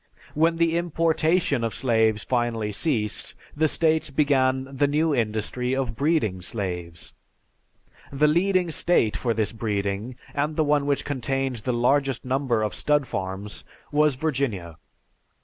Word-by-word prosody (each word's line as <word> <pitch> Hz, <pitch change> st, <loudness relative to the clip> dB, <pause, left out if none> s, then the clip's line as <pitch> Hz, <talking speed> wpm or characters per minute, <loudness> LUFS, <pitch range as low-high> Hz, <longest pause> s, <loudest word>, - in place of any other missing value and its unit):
When 165 Hz, +2 st, +2 dB
the 165 Hz, 0 st, +2 dB
importation 165 Hz, -4 st, +1 dB
of 115 Hz, -, -2 dB
slaves 110 Hz, -4 st, +2 dB
finally 120 Hz, -4 st, -1 dB
ceased 105 Hz, -2 st, -1 dB, 0.2 s
the 155 Hz, +1 st, +3 dB
states 160 Hz, 0 st, +1 dB
began 135 Hz, -2 st, +2 dB
the 145 Hz, +2 st, +2 dB
new 155 Hz, +2 st, +1 dB
industry 120 Hz, +2 st, -1 dB
of 135 Hz, -3 st, -2 dB
breeding 140 Hz, -, 0 dB
slaves; 90 Hz, -5 st, -5 dB, 1.0 s
the 145 Hz, +2 st, +3 dB
leading 180 Hz, +2 st, +2 dB
state 115 Hz, -, +2 dB
for 115 Hz, +4 st, -1 dB
this 105 Hz, -2 st, 0 dB
breeding, 105 Hz, +1 st, -3 dB, 0.2 s
and 150 Hz, +2 st, -1 dB
the 155 Hz, -, +2 dB
one 145 Hz, -1 st, +1 dB
which 140 Hz, -1 st, 0 dB
contained 135 Hz, -1 st, -1 dB
the 120 Hz, +3 st, -2 dB
largest 135 Hz, +2 st, +1 dB
number 130 Hz, -4 st, 0 dB
of 105 Hz, -, -2 dB
stud 150 Hz, -1 st, +1 dB
farms, 95 Hz, 0 st, -5 dB, 0.3 s
was 150 Hz, -1 st, +3 dB
Virginia. 125 Hz, -, -2 dB
130 Hz, 135 wpm, -25 LUFS, 110-150 Hz, 1.0 s, the